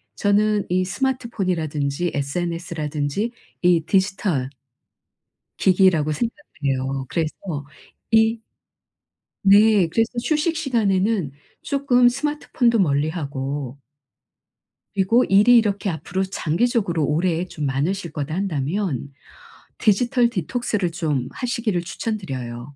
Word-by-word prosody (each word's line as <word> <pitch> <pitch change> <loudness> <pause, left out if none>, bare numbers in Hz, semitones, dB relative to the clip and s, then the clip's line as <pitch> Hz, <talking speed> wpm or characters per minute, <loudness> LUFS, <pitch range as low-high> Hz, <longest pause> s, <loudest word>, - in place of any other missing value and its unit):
저는 210 0 +2
이 185 +1 +1
스마트폰이라든지 180 - -1
SNS라든지 160 +4 -2 0.3
이 175 -2 +4
디지털 190 -8 0 1.1
기기라고 180 -5 +4
생각해요. 140 - -3
그래서 160 -2 -1 0.8
이 225 +1 +4 1.0
네. 205 -1 +6
그래서 225 +6 +1
휴식 315 +3 0
시간에는 210 - +1 0.3
쪼끔 265 -4 +3
스마트폰도 265 -3 0
멀리하고 140 -4 -1 1.2
그리고 205 +6 +3
‘일이 210 +5 +6
이렇게 205 -3 +1
앞으로 175 +3 -2
장기적으로 185 -1 0
오래 165 +3 0
좀 155 -4 -5
많으실 160 +6 -1
거다.‘ 150 0 -4
한다면 160 - -2 0.6
디지털 240 +3 +3
디톡스를 205 -1 -2
좀 150 -7 -1
하시기를 235 -7 -2
추천드려요. 140 - -5
185 Hz, 260 characters per minute, -22 LUFS, 150-225 Hz, 1.2 s, 네